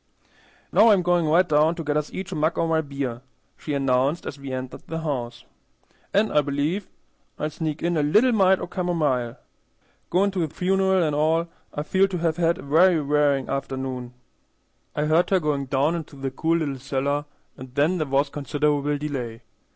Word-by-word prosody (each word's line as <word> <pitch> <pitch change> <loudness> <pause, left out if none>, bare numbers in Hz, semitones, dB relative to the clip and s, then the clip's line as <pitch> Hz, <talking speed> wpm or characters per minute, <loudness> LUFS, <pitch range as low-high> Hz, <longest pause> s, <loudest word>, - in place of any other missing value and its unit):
"Now 230 - +6
I'm 200 -4 +4
goin' 175 -1 +2
right 170 +4 +4
down 155 +2 +3
to 165 - -5
get 145 -1 -1
us 150 0 -1
each 190 0 -6
a - - -3
mug 155 +2 0
o' - - +2
my 160 -1 +2
beer," 140 -5 -4 0.3
she 150 - -4
announced 135 +3 +1
as 145 - -6
we 140 -1 -7
entered 130 0 -5
the 165 0 -4
house, 120 -6 -4 0.7
"an' 210 +2 +2
I 150 - +4
believe 145 +7 -2 0.5
I'll 150 - -2
sneak 155 0 -4
in 170 0 +1
a 155 - +2
little 210 - +4
mite 190 -4 +4
o' - - -3
camomile. 150 -10 -1 0.7
Goin' 195 +3 +2
to 190 - -3
the 160 -4 -1
funeral 190 +1 +2
an' 155 -2 0
all, 160 +3 +1 0.2
I 150 - -4
feel 190 +5 +3
to 190 -2 -4
have 165 -1 0
had 170 0 +2
a - - -10
very 165 +4 +4
wearin' 145 -2 +1
afternoon." 130 -2 -4 0.8
I 150 - 0
heard 160 +3 +3
her 190 - +3
going 145 -4 -1
down 140 +5 +1
into 160 -4 -6
the 135 -1 -4
cool 165 +5 +1
little 140 -5 -3
cellar, 140 +2 -1 0.3
and 130 0 -11
then 160 +6 +2
there 155 - -1
was 140 +1 +1
considerable 145 0 0
delay. 130 -6 -5
150 Hz, 190 wpm, -24 LUFS, 140-170 Hz, 0.8 s, Now